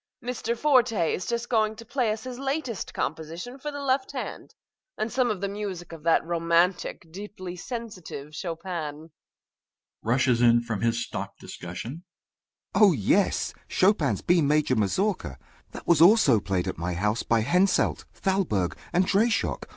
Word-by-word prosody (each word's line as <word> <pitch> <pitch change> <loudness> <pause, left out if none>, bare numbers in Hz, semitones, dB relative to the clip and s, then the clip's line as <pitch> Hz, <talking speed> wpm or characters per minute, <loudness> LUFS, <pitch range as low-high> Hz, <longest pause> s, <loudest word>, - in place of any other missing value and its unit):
Mr. 235 -1 -2
Forte 240 - +3
is 180 - -3
just 235 0 -2
going 220 -2 +1
to 230 +1 -11
play 240 -1 0
us 215 +1 -4
his 255 -1 -7
latest 270 - -3
composition 165 - -4
for 295 - -4
the 285 -1 -6
left 265 0 0
hand, - - -6 0.4
and 215 +1 -2
some 255 -2 +2
of 205 -4 -2
the 200 - 0
music 195 -4 -5
of 165 -2 -9
that 165 +1 +3
romantic, 170 +1 +1
deeply 185 -1 -7
sensitive 180 - -7
Chopin. 170 +2 -5 0.2
MR. - - -13
GOLD 160 +2 -14 0.9
(rushes 125 +1 +2
in 120 -1 +5
from 115 -4 -3
his 115 0 +1
stock - - -6
discussion). 115 - -7 0.7
Oh, 205 -4 +6
yes! 105 -10 +1
Chopin's 165 - +2
B 175 -1 +4
major 150 -2 +2
mazourka! 110 - 0 0.3
That - - -10
was 170 -2 +4
also 170 - +6
played 95 -3 -1
at - - -4
my 85 +1 -2
house 105 +5 0
by 115 -1 +2
Henselt, 180 - +2
Thalberg, 175 - 0 0.2
and 180 +2 +3
Dreyschock. 225 +4 +1
180 Hz, 160 wpm, -26 LUFS, 140-220 Hz, 0.9 s, Oh